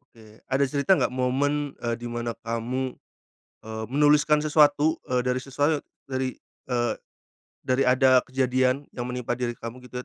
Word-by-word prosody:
Oke 110 Hz, -1 st, -17 dB
ada 135 Hz, +1 st, +2 dB
cerita 140 Hz, +7 st, +2 dB
nggak -, -, 0 dB
momen 140 Hz, +3 st, 0 dB
e -, -, -2 dB
di 120 Hz, -, -6 dB
mana 120 Hz, 0 st, -3 dB
kamu, 120 Hz, +3 st, -3 dB, 0.7 s
eee, 110 Hz, 0 st, -6 dB
menuliskan 150 Hz, +2 st, +4 dB
sesuatu 150 Hz, 0 st, +4 dB
e 125 Hz, -1 st, 0 dB
dari 125 Hz, 0 st, 0 dB
sesuau 145 Hz, +4 st, 0 dB, 0.3 s
dari, 130 Hz, -1 st, -2 dB, 0.3 s
eee, 120 Hz, -3 st, 0 dB, 0.7 s
dari 130 Hz, +1 st, +2 dB
ada 130 Hz, 0 st, +5 dB
kejadian 130 Hz, +1 st, +1 dB
yang 125 Hz, 0 st, -5 dB
menimpa 125 Hz, -1 st, -3 dB
diri 120 Hz, -1 st, -2 dB
kamu 115 Hz, +2 st, -8 dB
gitu 125 Hz, 0 st, -6 dB
130 Hz, 150 wpm, -25 LUFS, 120-140 Hz, 0.7 s, ada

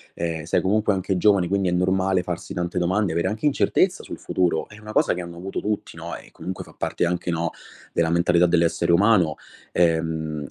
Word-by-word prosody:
Ehm, 85 Hz, -2 st, -3 dB
sei 85 Hz, -, +1 dB
comunque 105 Hz, +3 st, +2 dB
anche 95 Hz, 0 st, -1 dB
giovane 95 Hz, -1 st, +4 dB
quindi 95 Hz, 0 st, +1 dB
è -, -, -1 dB
normale 95 Hz, +1 st, +1 dB
farsi 90 Hz, -1 st, -5 dB
tante 90 Hz, +1 st, -3 dB
domande, 90 Hz, +1 st, +1 dB
avere 85 Hz, +1 st, 0 dB
anche 110 Hz, +6 st, -4 dB
incertezza 145 Hz, -, +2 dB
sul -, -, -8 dB
futuro, 90 Hz, -3 st, 0 dB
è 105 Hz, -, -14 dB
una 110 Hz, 0 st, -9 dB
cosa -, -, +3 dB
che 90 Hz, -, -4 dB
hanno 85 Hz, -1 st, -8 dB
avuto 95 Hz, +3 st, -4 dB
tutti, 105 Hz, -2 st, -3 dB
no, 85 Hz, +1 st, -6 dB
e -, -, -12 dB
comunque 95 Hz, 0 st, -6 dB
fa -, -, -16 dB
parte -, -, -1 dB
anche, 90 Hz, 0 st, -1 dB
no, 85 Hz, 0 st, -1 dB, 0.4 s
della 80 Hz, -, +2 dB
mentalità 85 Hz, +1 st, +3 dB
dell'essere 85 Hz, 0 st, +2 dB
umano. 90 Hz, -4 st, +4 dB, 0.4 s
Ehm, 80 Hz, -3 st, 0 dB
90 Hz, 200 wpm, -23 LUFS, 85-95 Hz, 0.4 s, giovane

